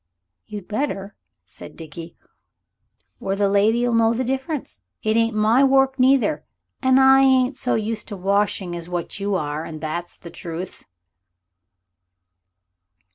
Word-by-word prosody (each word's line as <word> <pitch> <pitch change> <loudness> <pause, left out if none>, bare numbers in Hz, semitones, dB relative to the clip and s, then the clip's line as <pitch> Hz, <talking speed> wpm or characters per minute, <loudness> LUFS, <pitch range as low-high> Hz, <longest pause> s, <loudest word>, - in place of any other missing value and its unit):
"You'd 205 -3 -8
better," 210 -4 -3 0.3
said - - -11
Dickie, 165 +1 -9 1.0
"or 195 - -2
the 200 0 +1
lady'll 220 +5 +2
know 230 0 +3
the 255 - -1
difference. 265 - -4 0.2
It 215 0 +1
ain't 230 -1 +2
my 220 +5 +4
work 270 0 +3
neither, 270 +3 +3 0.4
and 260 0 +4
I 265 0 +6
ain't 260 0 +3
so 255 - 0
used 220 0 -3
to 205 - -7
washing 195 -1 0
as 170 0 -6
what 175 +2 -4
you 200 0 -1
are, 150 -2 -3
and 155 -1 -8
that's 165 +3 -5
the 170 - -11
truth." 170 +2 -7
215 Hz, 135 wpm, -22 LUFS, 180-255 Hz, 1.0 s, I